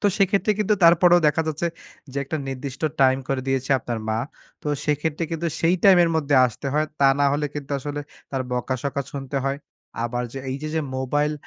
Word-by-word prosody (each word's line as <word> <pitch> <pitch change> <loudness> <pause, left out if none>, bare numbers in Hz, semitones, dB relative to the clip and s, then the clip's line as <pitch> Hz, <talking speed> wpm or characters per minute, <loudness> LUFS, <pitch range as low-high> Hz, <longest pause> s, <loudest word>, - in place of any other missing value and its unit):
তো 205 - +2
সেক্ষেত্রে 200 +1 +3
কিন্তু 210 0 +2
তারপরেও 175 +1 +6
দেখা 160 +2 +1
যাচ্ছে, 160 +3 -1 0.5
যে - - -8
একটা 160 - -3
নির্দিষ্ট 135 +2 -6 0.2
টাইম 130 0 +5
করে 135 -1 0
দিয়েছে 135 +1 -1
আপনার 120 -3 -4
মা। 110 0 0 0.4
তো - - -3 0.2
সেক্ষেত্রে 150 +2 -1
কিন্তু 165 +1 -2
সেই 170 +2 +3
টাইমের 175 -4 +6
মধ্যে 145 -2 +1
আসতে 120 +4 -7
হয়। 155 +1 +2
তা 140 - +6
না 145 - +5
হলে 150 +1 0
কিন্তু 145 -1 -6
আসলে 145 +2 -4 0.3
তার 135 -2 -1
বকাঝকা 130 +3 -2
শুনতে 140 0 -5
হয়। 135 +1 -1 0.5
আবার 120 +1 -2 0.3
এইযে 140 +4 -4
যে 160 - +1 0.2
মোবাইল 145 +3 0
145 Hz, 185 wpm, -23 LUFS, 135-165 Hz, 0.5 s, তারপরেও